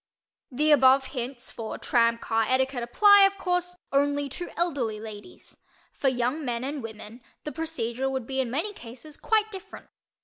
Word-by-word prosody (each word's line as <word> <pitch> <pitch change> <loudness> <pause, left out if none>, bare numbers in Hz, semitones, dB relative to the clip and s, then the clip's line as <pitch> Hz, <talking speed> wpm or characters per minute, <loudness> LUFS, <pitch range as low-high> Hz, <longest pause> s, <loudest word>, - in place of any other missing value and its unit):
The 300 +4 +2
above 265 -1 +6
hints 250 -1 -5
for 220 -1 -6
"tram" 230 -1 +2
car 225 -1 0
etiquette 260 0 +1
apply, 405 - +6
of 395 0 -7
course, 360 -1 -1 0.2
only 285 +1 +1
to 350 +6 -6
elderly 275 -11 -1
ladies. 215 - -11 0.3
For 275 - -2
young 255 +4 -1
men 240 -2 -2
and 280 +1 -4
women 225 +1 -9 0.2
the 300 - -5
procedure 270 -6 -3
would 265 -3 -3
be 265 +2 -3
in 250 - -3
many 325 - -2
cases 255 - -11
quite 435 -1 +1
different. 390 0 -10
265 Hz, 165 wpm, -26 LUFS, 240-320 Hz, 0.3 s, above